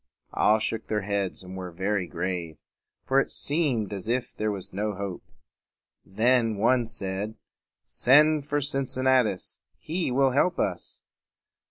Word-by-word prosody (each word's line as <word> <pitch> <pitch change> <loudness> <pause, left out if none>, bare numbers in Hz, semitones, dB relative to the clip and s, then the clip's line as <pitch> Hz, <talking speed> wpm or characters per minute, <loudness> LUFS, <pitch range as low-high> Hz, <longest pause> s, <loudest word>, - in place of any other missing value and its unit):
All 110 - +4
shook 110 +1 -3
their 105 -2 -1
heads 100 -2 -2
and 90 +1 -9
were 95 -1 -5
very 95 +2 -1
grave; 85 -2 -4 0.5
for 135 +1 +3
it - - 0
seemed 140 - 0
as 95 0 -6
if 120 +1 -1
there 110 0 -1
was 100 -4 -5
no 105 +1 -2
hope. 100 -2 -5 0.8
Then 115 +2 +2
one 120 +3 +2
said, 105 -1 -3 0.5
"Send 150 +3 +4
for 145 0 0
Cincinnatus. 130 -6 +1 0.2
He 170 0 -2
will 135 +1 +3
help 175 +7 +2
us." 90 -4 -3
110 Hz, 140 wpm, -26 LUFS, 95-130 Hz, 0.8 s, All